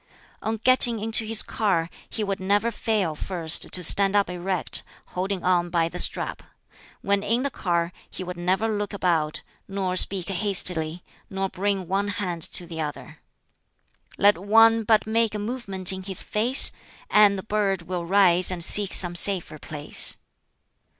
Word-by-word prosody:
On 225 +1 -4
getting 245 0 +6
into 220 +1 -2
his 225 -1 +3
car, 190 -7 -2 0.2
he 220 - -5
would 195 -1 -4
never 205 +4 -1
fail 210 -7 -2
(first) 165 0 +1
to 180 - +2
stand 195 +4 +3
up 200 -3 +1
erect, 180 0 0 0.3
holding 185 0 -4
on 175 -1 0
by 165 -1 -1
the 180 - -7
strap. - - +1 0.6
When 200 0 -1
in 230 +5 -1
the 280 - -3
car, 170 -4 -3 0.2
he - - -9
would 180 0 -7
never 185 +5 -2
look 210 -1 -4
about, 165 -5 -2 0.2
nor 195 -2 -4
speak 185 -1 +3
hastily, 180 -4 0 0.3
nor 195 -1 -4
bring 190 -1 -3
one 195 +3 -2
hand 185 -5 -4
to 175 - 0
the 165 -1 -7
other. 150 -1 -8 1.0
"Let 205 -3 +3
one 225 +3 +3
but 215 0 +2
make 225 0 -1
a - - -2
movement 205 -4 -4
in 190 - -7
his 190 -1 -3
face, 240 +6 +4 0.4
And 205 -1 +4
the 190 - -7
bird 200 -4 -2
will 175 0 -5
rise 185 -1 +3
and 175 -3 0
seek 205 -2 +4
some 175 -2 +4
safer 175 -4 +1
place." 150 -1 +2
195 Hz, 165 wpm, -23 LUFS, 175-210 Hz, 1.0 s, getting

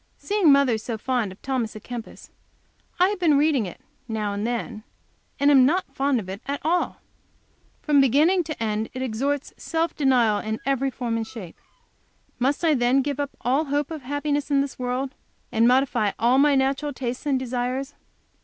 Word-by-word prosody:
Seeing 405 -7 +3
mother 275 -5 +4
so 225 +1 -4
fond 240 -3 -1
of 190 - -13
Thomas 255 -5 -2
A - - -6
Kempis, 235 +1 -9 0.7
I 365 +1 +5
have 410 -2 -3
been 315 -5 +4
reading 285 -7 +2
it, 175 - -10 0.3
now 215 -3 -2
and 205 +2 -2
then, 235 -2 -3 0.6
and 285 +1 +4
am 270 -3 +7
not 300 +1 +1
fond 275 -2 +1
of 195 - -7
it 195 +3 -6
at 280 0 -2
all. 345 +3 0 0.8
From 290 -2 +4
beginning 305 +8 +4
to 310 -7 -4
end 215 0 -1
it 260 - -3
exhorts 270 +4 -2
to - - -22
self 330 -1 -1
denial 245 -7 +3
in 220 0 -3
every 275 0 +1
form 240 -3 -3
and 225 -1 -3
shape. 220 -10 -9 0.8
Must 275 +6 +1
I 315 - +4
then 255 +1 +2
give 285 0 -3
up 285 -1 -4
all 265 +7 +1
hope 290 +1 -1
of 315 -2 -5
happiness 290 +2 -2
in 280 -1 +3
this 275 -2 -5
world, 255 +2 -2 0.4
and 225 +1 +3
modify 250 -5 +2
all 245 +3 +3
my 290 0 +5
natural 275 +2 0
tastes 255 +2 -4
and 275 -2 +2
desires? 255 +2 -3
265 Hz, 190 wpm, -24 LUFS, 235-285 Hz, 0.8 s, am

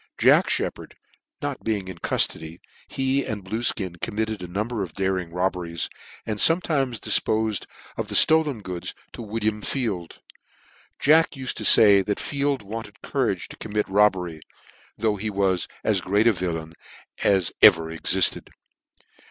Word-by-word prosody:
Jack - - +4
Sheppard - - -3 0.5
not 145 -2 -4
being 105 -4 -2
in 90 -2 -9
cuftody, 80 +1 -1 0.3
he 135 +1 -1
and 105 -3 -6
Pluefkin 95 -4 -2
committed 110 -1 -2
a 90 - -6
number 105 +5 -3
of 90 -5 -5
daring 95 -3 -2
robberies, 90 -2 -2 0.4
and 110 -2 -4
fometimes 145 - +2
difpofed 110 -2 +1 0.3
of - - -4
the - - -3
itolen 150 -8 +4
goods 90 -2 -6 0.2
to - - -8
William 110 -1 -2
Field. 105 -12 -3 0.8
Jack 160 +3 +4
uled 130 -1 -4
to - - -6
fay 100 -2 +7
that 100 +1 -3
Field 140 -3 -2
wanted 105 0 -8
courage 120 -10 -1
to - - -11
commit 105 -1 -3
a - - -13
robbery, 95 -6 +1 0.6
though 110 -2 0
he 105 +2 -3
was 95 -3 0 0.2
as - - +1
great 100 +4 +1
a 115 - +5
villain 80 -3 -4 0.5
as 95 -4 +2
ever 80 -1 +6
exifted. 80 -2 +1
105 Hz, 145 wpm, -24 LUFS, 90-115 Hz, 0.8 s, fay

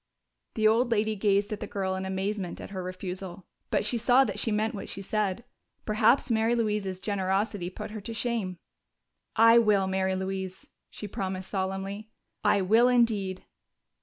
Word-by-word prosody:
The 215 -1 +3
old 235 +3 +3
lady 220 -1 +1
gazed 205 +1 +1
at 210 - -5
the - - -5
girl 190 -2 -2
in 190 0 -3
amazement 190 -1 -3
at - - -9
her 190 -2 -4
refusal. 185 0 -6 0.2
But - - +1
she 235 +2 +1
saw 245 +3 +5
that 205 -5 -3
she 225 - +1
meant 215 +1 0
what 200 - -6
she - - -5
said; 210 +1 -1 0.4
perhaps 235 +4 +3
Mary 225 +1 +2
Louise's 210 -5 -1
generosity 195 -1 -1
put 190 - -7
her 215 -1 -6
to 225 +3 -6
shame. 220 -6 -2 0.8
"I 230 +1 +7
will, 210 -4 +3
Mary 190 0 0
Louise," 190 0 -4 0.2
she 210 - -7
promised 190 -1 -4
solemnly. 195 +2 -3 0.3
"I 200 - +3
will 225 +6 +5
indeed." 220 -7 +1
205 Hz, 165 wpm, -28 LUFS, 190-220 Hz, 0.8 s, I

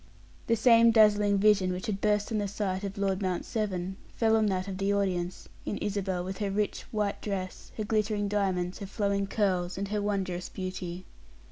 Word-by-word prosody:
The 230 - +4
same 230 0 +6
dazzling 210 -2 +5
vision 195 -2 +4
which 180 0 -4
had 200 -2 -2
burst 210 0 +1
on 215 - +1
the 205 - -1
sight 195 -1 -2
of 200 +1 -5
Lord 195 -1 0
Mount 185 -2 -1
Severn 190 -4 -2 0.2
fell 225 -1 +3
on 220 -1 +3
that 185 -1 -1
of 190 -1 -5
the 195 +1 +1
audience, 185 -3 -1 0.2
in - - -3
Isabel, 195 -3 -2
with 190 +3 -5
her 205 -2 -1
rich, 205 +1 -2
white 210 -2 -1
dress, 190 -3 -5
her 215 - -1
glittering 210 -1 0
diamonds, 190 -3 -1
her 200 - -6
flowing 200 -1 0
curls, 185 -4 0
and 200 0 -3
her 210 0 -1
wondrous 190 -3 -2
beauty. 185 -1 -5
200 Hz, 195 wpm, -29 LUFS, 185-210 Hz, 0.2 s, same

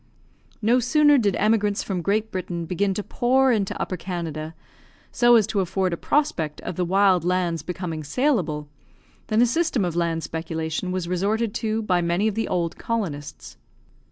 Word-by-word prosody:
No 240 +4 +4
sooner 295 +3 +4
did 205 -5 +1
emigrants 210 -1 +1
from 185 -3 -3
Great 215 +4 0
Britain 175 -2 -4
begin 190 +3 0
to 210 - -3
pour 260 +4 +2
into 205 -5 -1
Upper 185 - -3
Canada, 165 -3 -5 0.6
so 240 -1 +5
as 220 -3 +5
to 220 -1 -1
afford 185 0 0
a - - +1
prospect 170 - -1
of 180 - -5
the 180 - 0
wild 190 -1 +3
lands 175 -2 0
becoming 165 -1 -5
saleable, 165 - 0 0.6
than 220 +2 +3
a - - +6
system 265 - +1
of 170 -2 -3
land 165 -1 0
speculation 160 +2 -3
was 185 -2 -2
resorted 205 +5 0
to 220 -1 -1
by 180 -4 +1
many 175 +5 +1
of 215 - 0
the 225 +2 -2
old 170 -2 -2
colonists. 150 -11 -4
185 Hz, 170 wpm, -24 LUFS, 170-220 Hz, 0.6 s, a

